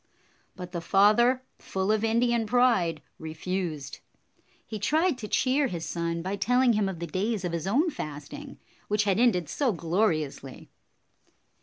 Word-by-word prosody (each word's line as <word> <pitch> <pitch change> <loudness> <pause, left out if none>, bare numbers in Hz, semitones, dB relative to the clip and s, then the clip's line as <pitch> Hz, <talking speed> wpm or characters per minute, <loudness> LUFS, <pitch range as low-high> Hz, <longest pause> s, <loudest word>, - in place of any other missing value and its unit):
But 180 -1 -8
the 170 -2 -4
father, 215 +8 +4 0.2
full 190 +2 -1
of 215 0 +1
Indian 235 0 +2
pride, 210 -10 +2 0.2
refused. 160 -2 -4 0.7
He 215 - -6
tried 310 - +2
to 215 - -5
cheer 270 +5 +2
his 170 -7 -5
son 170 0 -3
by 195 +2 -3
telling 250 +3 +3
him 210 -2 +1
of 190 - -5
the 170 - -4
days 190 +4 -2
of 175 - -2
his 170 +1 -3
own 295 - +2
fasting, 150 - -7 0.3
which 210 0 +1
had 200 0 +1
ended 195 -9 +3
so 275 -5 0
gloriously. 165 -7 -2
200 Hz, 150 wpm, -27 LUFS, 170-240 Hz, 0.7 s, father